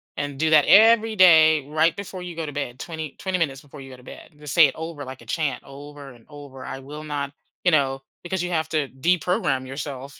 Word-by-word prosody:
and 145 Hz, -1 st, -5 dB
do 160 Hz, 0 st, +2 dB
that 150 Hz, -2 st, +6 dB
every 225 Hz, +1 st, +6 dB
day, 160 Hz, -6 st, +6 dB
right 160 Hz, +2 st, +1 dB
before 190 Hz, -2 st, -7 dB
you 175 Hz, -2 st, -8 dB
go 165 Hz, -1 st, -4 dB
to 145 Hz, -, -6 dB
bed, 130 Hz, -3 st, -5 dB
twenty 160 Hz, -3 st, -6 dB
20 190 Hz, -1 st, -2 dB
minutes 140 Hz, -6 st, -2 dB
before 145 Hz, 0 st, -13 dB
you 135 Hz, -, -11 dB
go 130 Hz, -, -11 dB
to 125 Hz, -, -18 dB
bed, -, -, -12 dB
and 150 Hz, -, -26 dB
just 150 Hz, -2 st, -7 dB
say 165 Hz, -, +7 dB
it -, -, -7 dB
over 160 Hz, -2 st, -7 dB
like 130 Hz, -1 st, -10 dB
a -, -, -15 dB
chant, 135 Hz, +1 st, -2 dB
over 140 Hz, 0 st, -11 dB
and 115 Hz, -2 st, -20 dB
over, 145 Hz, -3 st, -11 dB
"I 135 Hz, -, -6 dB
will 150 Hz, +3 st, -9 dB
not" 145 Hz, -2 st, -4 dB, 0.3 s
you 180 Hz, -, +3 dB
know, 135 Hz, -3 st, +1 dB, 0.2 s
because 180 Hz, +1 st, -3 dB
you 180 Hz, -, -3 dB
have 160 Hz, -2 st, -1 dB
to 150 Hz, -3 st, -1 dB
deprogram 145 Hz, -2 st, 0 dB
yourself, 135 Hz, 0 st, -7 dB
150 Hz, 240 wpm, -23 LUFS, 135-165 Hz, 0.3 s, say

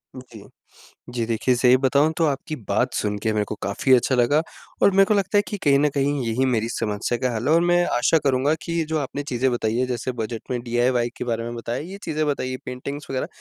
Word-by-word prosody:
जी। 120 Hz, -5 st, -11 dB, 0.7 s
जी 120 Hz, -2 st, 0 dB
देखिए 115 Hz, +3 st, +1 dB
सही 125 Hz, +1 st, +5 dB
बताऊँ 140 Hz, +4 st, +2 dB
तो 165 Hz, -, +2 dB
आपकी 145 Hz, +2 st, -3 dB
बात -, -, +1 dB
सुन 105 Hz, -1 st, -1 dB
के 110 Hz, -, +1 dB
मेरे 105 Hz, -1 st, 0 dB
को 105 Hz, -, -5 dB
काफ़ी 100 Hz, +7 st, 0 dB
अच्छा 130 Hz, +1 st, +2 dB
लगा 130 Hz, +5 st, +3 dB, 0.4 s
और -, -, +7 dB
मेरे 195 Hz, 0 st, +5 dB
को 210 Hz, -, +1 dB
लगता 200 Hz, 0 st, +2 dB
है -, -, +4 dB
कि 210 Hz, -, -3 dB
कहीं 140 Hz, -1 st, +4 dB
न 150 Hz, +1 st, +3 dB
कहीं 140 Hz, 0 st, 0 dB
यही 115 Hz, +3 st, 0 dB
मेरी 115 Hz, -3 st, 0 dB
समस्या 115 Hz, +1 st, -2 dB
का 125 Hz, -, 0 dB
हल 115 Hz, +4 st, -2 dB
है 155 Hz, -, +5 dB
और 165 Hz, -, +5 dB
मैं 175 Hz, 0 st, +4 dB
आशा 140 Hz, +6 st, +3 dB
करूँगा 135 Hz, +2 st, +2 dB
कि 170 Hz, -, -5 dB
ये 165 Hz, -1 st, 0 dB
जो 160 Hz, -, +1 dB
आपने 145 Hz, 0 st, -3 dB
चीज़ें 130 Hz, -2 st, 0 dB
बताई 110 Hz, -2 st, -1 dB
हैं 130 Hz, -, +1 dB
जैसे 125 Hz, +1 st, -3 dB
बजट 110 Hz, 0 st, -5 dB
में 125 Hz, -1 st, -1 dB
डीआईवाई 120 Hz, 0 st, +1 dB
के -, -, -4 dB
बारे 115 Hz, -1 st, -2 dB
में 120 Hz, 0 st, -5 dB
बताया, 115 Hz, +1 st, -4 dB
ये 185 Hz, +6 st, -8 dB
चीज़ें 155 Hz, -1 st, -1 dB
बताई 130 Hz, -3 st, -2 dB
पेंटिंग्स 140 Hz, +3 st, -6 dB
वग़ैरह 130 Hz, -1 st, -2 dB
130 Hz, 240 wpm, -23 LUFS, 120-145 Hz, 0.7 s, और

